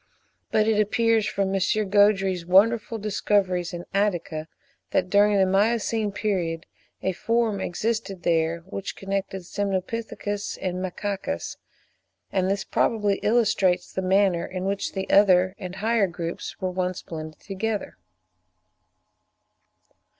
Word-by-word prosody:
But 215 0 +2
it 220 -1 +3
appears 225 +1 +2
from 195 -1 -1
M. 195 - 0 0.3
Gaudry's 195 -3 +3
wonderful 215 +6 +3
discoveries 200 -4 0
in 175 0 -6
Attica, 175 -6 -1 0.4
that 180 - 0
during 205 0 +5
the 190 - +5
Miocene 215 +2 +1
period 180 -5 -2 0.4
a 190 - +1
form 225 +1 0
existed 205 -1 -2
there, 165 0 +1
which 195 +2 -6
connected 195 -1 -3
Semnopithecus 205 +2 -3
and 180 -1 -2
Macacus; 200 +7 -4 0.7
and 190 -1 +1
this 195 0 0
probably 210 -4 +1
illustrates 200 -5 +2
the 190 - -1
manner 190 -2 +3
in 185 0 -5
which 195 0 -2
the 190 -1 -3
other 185 -2 +5
and 185 -1 -6
higher 215 +1 +2
groups 170 -1 -6
were 185 -1 -2
once 180 0 -2
blended 155 -1 -7
together. 205 +2 -4
195 Hz, 120 wpm, -25 LUFS, 185-210 Hz, 0.7 s, during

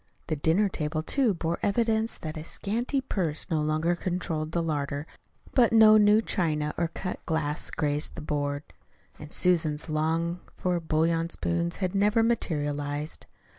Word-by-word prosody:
The 155 - +1
dinner 165 +8 +2
table, 155 -3 -2
too, 240 - +1
bore 165 0 -2
evidence 225 +1 +1
that 155 -1 -6
a 155 - -5
scanty 235 - -2
purse 175 - -2
no 155 -2 +2
longer 155 +3 +1
controlled 170 -3 -3
the 170 0 0
larder, 145 -2 -2 0.5
but 245 -3 +4
no 220 -1 +8
new 210 +1 +5
china 150 -7 0
or 170 - 0
cut 180 +2 -6
glass 160 -1 -1
graced 150 0 -1
the 165 - -6
board, 145 -1 -2 0.6
and 150 - -10
Susan's 160 -3 +1
longed 165 +3 0 0.2
for 180 -1 0
bouillon 165 +1 +1
spoons 170 0 -1
had 185 -1 -2
never 210 +3 +3
materialized. 145 -8 -1
165 Hz, 150 wpm, -27 LUFS, 155-195 Hz, 0.6 s, no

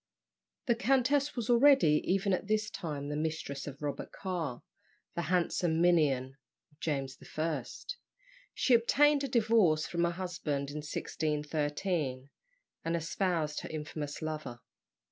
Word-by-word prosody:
The 240 - +4
countess 270 +5 +2
was 240 -4 -2
already, 240 - +6
even 195 +1 +2
at 185 - -1
this 215 0 0
time, 145 -4 -4
the 150 - -2
mistress 155 -3 -3
of 140 +1 -8
Robert 145 -1 -4
Carr, 170 -10 -4 0.5
the 170 - -2
handsome 175 -2 +1
minion 140 -7 +3 0.3
of 150 - -29
James 135 -4 -2 0.2
I. 155 -4 0 0.9
She 255 - +3
obtained 285 +5 +4
a - - 0
divorce 220 - +3
from 170 0 -1
her - - +2
husband 165 -6 -3
in 150 - -5
1613, 150 -1 -2 0.5
and 165 +1 0
espoused 165 -2 -1
her - - -7
infamous 150 -1 -5
lover. 150 -6 -5
160 Hz, 130 wpm, -31 LUFS, 150-200 Hz, 0.9 s, already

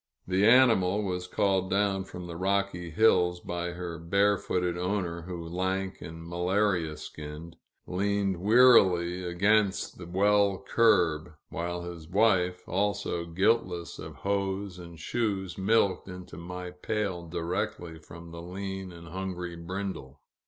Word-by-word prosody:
The 95 +3 +3
animal 110 -5 +5
was 90 -2 -3
called 95 -3 +1
down 100 -1 +1
from 90 -2 -8
the 85 -1 -7
rocky 95 -1 -1
hills, 90 -1 +3
by 85 0 -4
her 85 -2 -6
barefooted 90 0 +1
owner, 90 -1 -2
who, 85 -1 -6
lank 95 +2 -2
and 80 +1 -8
malaria 90 -2 0
skinned, 75 +2 -8 0.3
leaned 100 0 0
wearily 95 -5 +5
against 100 +3 +1
the 90 - -8
well 100 +2 +3
curb, 90 -8 +3 0.2
while 85 +1 -3
his 85 -2 -8
wife, 90 -3 +2
also 95 -3 -1
guiltless 90 -1 0
of - - -8
hose 100 -1 -2
and 85 -1 -10
shoes, 100 -2 -2
milked 100 -1 +2
into 90 -1 -9
my 90 +1 -7
pail 90 -2 -3
direct 85 +1 -2 0.2
from 85 0 -11
the 85 0 -8
lean 95 +1 -5
and 85 -1 -11
hungry 90 -1 -4
brindle. 85 -6 -6
90 Hz, 130 wpm, -29 LUFS, 85-100 Hz, 0.3 s, animal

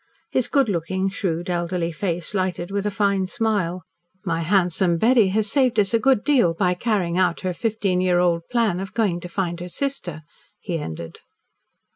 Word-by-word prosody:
His 250 -2 +1
good 275 -1 +2
looking, 190 +1 -1
shrewd, 175 -2 -2
elderly 175 -1 -1
face 170 +1 -3
lighted 185 -2 -2
with 200 +1 -1
a - - +2
fine 200 -2 +1
smile. 190 -5 -1 0.4
"My 165 -2 -1
handsome 175 -1 +2
Betty 230 +2 +4
has 210 +3 +1
saved 260 -6 +2
us 200 +2 +2
a 230 - +4
good 265 -3 +3
deal 245 - +3
by 180 +1 +2
carrying 180 -3 0
out 180 -2 +1
her 185 -1 -2
fifteen 200 -3 0
year 180 -1 +2
old 175 -1 +2
plan 230 -7 +1
of 195 0 -7
going 205 -7 +1
to 175 - -8
find 175 -2 -2
her 175 - -6
sister," 180 - -3 0.4
he 170 -4 -3
ended. 80 - -7
185 Hz, 180 wpm, -23 LUFS, 175-210 Hz, 0.4 s, Betty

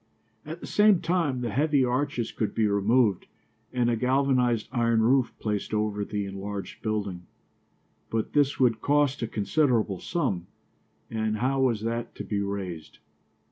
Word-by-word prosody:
At 160 +2 -7
the - - -6
same 210 -3 +4
time 165 -9 0
the 120 -2 -2
heavy 145 +2 +2
arches 125 -1 -1
could 110 - -3
be 110 - +2
removed 105 +1 +2 0.4
and 125 -2 +1
a 120 - +2
galvanized 125 -2 +1
iron 115 -2 +2
roof 125 +1 +3
placed 105 0 -2
over 105 -1 -1
the 105 0 -3
enlarged 100 +1 -6
building. 100 -5 -3 0.8
But 110 -1 -2
this 145 -2 +2
would 120 -4 +3
cost 145 -1 +2
a 115 - -1
considerable 110 - +1
sum, 95 - -2 0.6
and 110 -1 -1
how 135 +3 +1
was 120 -5 +2
that 115 +1 -3
to - - -6
be 105 - -2
raised? 95 -5 -5
115 Hz, 150 wpm, -27 LUFS, 105-135 Hz, 0.8 s, same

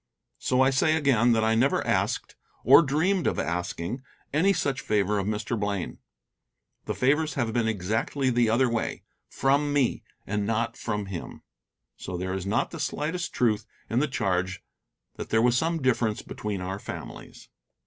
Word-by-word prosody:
So 130 0 +1
I 130 +1 +5
say 155 +4 +3
again 130 -6 +3
that 110 -1 +2
I 110 0 +3
never 120 +5 +2
asked, - - 0 0.3
or 135 +7 +8
dreamed 170 +6 +1
of - - 0
asking, 90 +7 -3 0.3
any 170 +7 +4
such 140 -9 -1
favor 105 -1 +1
of 100 - -2
Mr. 110 +1 -2
Blaine. 100 -3 -3 0.9
The - - -3
favors 150 +4 +1
have 120 -4 -1
been 115 -1 +1
exactly 110 +6 0
the 120 -2 +3
other 125 +4 +3
way 115 -1 -2 0.3
from 140 +2 +1
me, 140 -4 +1 0.2
and 105 +1 -1
not 115 +1 0
from 105 -3 -3
him. 95 -3 -7 0.5
So 90 - -5
there 95 +1 -3
is 95 0 -4
not 105 - 0
the 165 - -7
slightest 155 +3 -2
truth 110 -4 +1 0.2
in 115 - +2
the 150 - +2
charge 95 -7 -1 0.5
that - - -6
there 110 - +3
was 120 +1 +3
some 165 +6 +1
difference 115 -4 +1
between 105 -3 -4
our 95 +2 -4
families. - - -9
115 Hz, 170 wpm, -27 LUFS, 105-140 Hz, 0.9 s, or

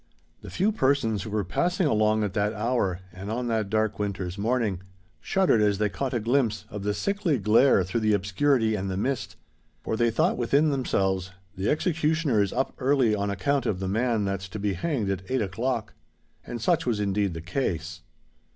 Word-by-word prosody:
The - - -9
few 200 +4 +1
persons 130 - +1
who 110 - -6
were 105 0 -1
passing 175 - 0
along 110 -4 +2
at 100 -2 -2
that 105 +1 0
hour, 105 -5 -1
and 95 +2 -7
on 120 +3 -2
that 110 -3 0
dark 110 -1 0
winter's 95 -3 -3
morning, 105 -3 0 0.4
shuddered 185 - +2
as 105 -1 +2
they 105 0 +1
caught 130 +3 -3
a - - +1
glimpse 115 -2 0
of 105 - -5
the 105 +1 -1
sickly 200 -7 0
glare 105 +1 +4
through 95 +6 -2
the 110 -1 +2
obscurity 110 +4 +1
and 100 -2 -2
the 95 - -3
mist—for 80 - -5
they 120 +1 +2
thought 115 - +1
within 140 +6 +3
themselves, 95 -9 0 0.3
"The 95 +3 -1
executioner 155 - +1
is 100 - 0
up 135 - -1
early 130 -4 +3
on 100 -1 -1
account 140 +8 0
of 90 - -1
the 95 - -3
man 110 +1 +1
that's 95 -1 -3
to 105 - -6
be 100 -1 -1
hanged 110 - -1
at 95 -1 -2
eight 130 -3 +1
o'clock." 115 +3 -2 0.5
And 120 - -5
such 110 - +1
was 115 -4 +1
indeed 100 -2 0
the 80 - -5
case. 85 - -3
110 Hz, 190 wpm, -26 LUFS, 100-130 Hz, 0.5 s, glare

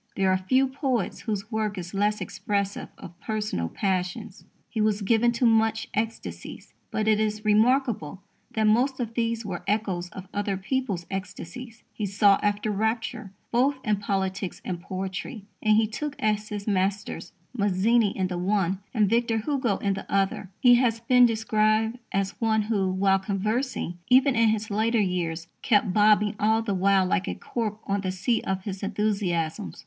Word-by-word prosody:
There 190 -1 +2
are 185 - +3
few 260 +8 +2
poets 260 - -2
whose 215 -1 -4
work 215 -2 -1
is 175 +1 -6
less 210 +1 +1
expressive 200 -1 -2
of 170 +1 -12
personal 210 - -2
passions. 190 - -3 0.2
He 220 - -3
was 210 -1 +2
much - - -5
given 235 +1 +4
to 225 -2 +4 0.2
ecstasies, 225 +2 -5 0.2
but 215 0 -1
it 215 -1 +4
is 215 0 -1
remarkable 215 - +2 0.3
that 220 - +1
most 250 +5 +3
of 230 -2 -3
these 230 -1 -1
were 180 -4 -4
echoes 195 -4 -1
of 190 +1 -10
other 200 -1 -1
people's 200 -4 -2
ecstasies. 195 +5 -7
He 210 - -3
sought 200 0 +4
after 205 +1 0
rapture 220 0 -2 0.2
both 260 +4 +3
in 210 -3 +1
politics 195 -2 -2
and 175 -2 -4
poetry, 190 +4 -5 0.2
and 215 0 +4
he 220 - +4
took 290 +7 -4
as 215 -3 0
his 205 -1 -5
masters 200 0 -1 0.2
Mazzini 205 +2 +3
in 190 - +1
the 180 -1 -3
one 190 0 0 0.2
and 210 -2 +4
Victor 230 +1 +1
Hugo 240 -3 0
in 200 -1 0
the 195 - -7
other. 195 -1 0
He 245 -1 +6
has 230 -3 +1
been 250 +1 +5
described 220 +1 +1
as 195 0 0
one 220 -1 +2
who, 200 -3 0
while 195 +1 +2
conversing, 205 0 -2
even 260 +1 +5
in 230 -1 +4
his 215 0 -1
later 225 +3 +2
years, 175 -4 -1
kept 205 -4 +2
"bobbing 210 0 +4
all 220 +2 +2
the 210 -3 -1
while 190 0 +3
like 190 +1 0
a - - -2
cork 220 -3 -3
on 200 0 -1
the 185 -1 -2
sea 200 +6 0
of 190 0 -3
his 190 -2 -5
enthusiasms." 185 - -1
210 Hz, 170 wpm, -26 LUFS, 195-225 Hz, 0.3 s, He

